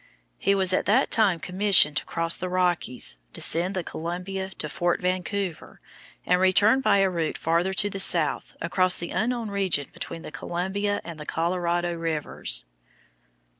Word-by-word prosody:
He 200 +1 +2
was 190 -1 +3
at - - 0
that 235 +7 +2
time 200 -6 +2
commissioned 185 -4 +4
to - - -1
cross 165 0 -1
the 185 - -4
Rockies, 175 - +1 0.2
descend 180 +4 +1
the 185 - -2
Columbia 180 +4 -5
to 165 -5 -5
Fort 175 +3 -1
Vancouver, 185 0 -3 0.5
and 180 0 +2
return 205 +7 +4
by 210 -5 +3
a 195 -1 +3
route 165 -3 -2
farther 170 +3 0
to 205 - +1
the 195 -1 -5
south, 170 -5 +2
across 185 +2 +2
the 170 - -5
unknown 225 +2 -2
region 190 -8 -1
between 165 0 -7
the - - -8
Columbia 190 +5 -3
and 165 -2 -9
the 150 - -8
Colorado 175 0 -1
rivers. 155 - -1
180 Hz, 160 wpm, -25 LUFS, 170-195 Hz, 0.5 s, commissioned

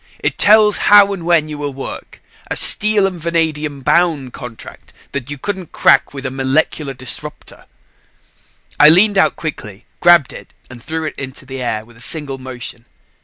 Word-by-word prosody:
"It - - -3
tells 210 0 +5
how 205 -1 +6
and 175 -4 -7
when 165 -3 +2
you 150 -1 -8
will 145 -2 -5
work. 135 - -9 0.3
A - - -2
steel 210 -1 +4
and 185 -3 -4
vanadium 155 -4 -2
bound 150 -4 0
contract 120 -2 -12 0.2
that 140 -2 -6
you 145 - -6
couldn't 185 +3 -6
crack - - +3
with 135 -1 -9
a 130 - -3
molecular 135 +1 -1
disruptor." 130 -1 -5 1.1
I 150 - +8
leaned 195 +4 +4
out - - +2
quickly, 105 - -8
grabbed 175 -6 +4
it - - -13 0.2
and 120 -1 -12
threw 160 +2 -4
it 155 - -4
into 135 0 -8
the 135 0 -7
air 110 -3 -3
with 120 0 -20
a - - -16
single 140 -2 -1
motion. 125 -2 -8
150 Hz, 170 wpm, -16 LUFS, 130-175 Hz, 1.1 s, I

